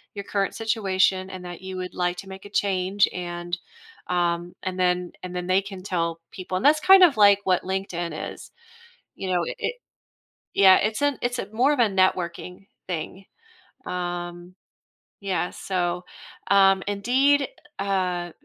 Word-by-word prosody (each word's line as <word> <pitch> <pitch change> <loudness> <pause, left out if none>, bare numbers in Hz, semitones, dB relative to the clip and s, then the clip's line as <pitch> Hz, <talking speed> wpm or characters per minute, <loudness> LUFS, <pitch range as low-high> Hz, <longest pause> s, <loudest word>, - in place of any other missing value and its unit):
your 200 - -5
current 200 0 -1
situation, 195 -4 +1
and 185 -1 -8
that 175 0 -8
you 190 0 -6
would 185 0 -5
like 180 0 -1
to 195 +2 -9
make 190 +1 -10
a - - -9
change, 195 -1 +1
and, 175 0 -4 0.5
um, 175 -1 -1
and 185 0 -4
then 180 -1 +1
and 180 0 -6
then, 180 0 -3
they 185 +1 +3
can 195 -1 -9
tell 170 -3 -2
people 185 -1 -6
and 190 - -3
that's 305 +1 +6
kind 380 +2 +7
of 310 -9 +5
like 200 -1 +6
what 185 -2 +1
LinkedIn 175 -4 -3
is, - - -13 0.7
you 190 - -4
know? 180 -1 +2
I - - -4
it - - -2 0.8
Yeah, 190 -1 +7
it's 215 +4 -1
an 285 -2 +1
it's 245 0 -1
a - - -3
more 255 +6 +3
of 290 - -1
a - - +7
networking 185 -1 -1 0.2
thing. 185 +3 -5 0.6
Um, 175 0 -5 0.7
yeah, 180 -3 -1
so, 180 -1 -2 0.5
um, 195 -1 +5
Indeed, 260 +7 +2 0.3
eh, - - -1
uh, 180 -3 -1
185 Hz, 165 wpm, -24 LUFS, 180-200 Hz, 0.8 s, kind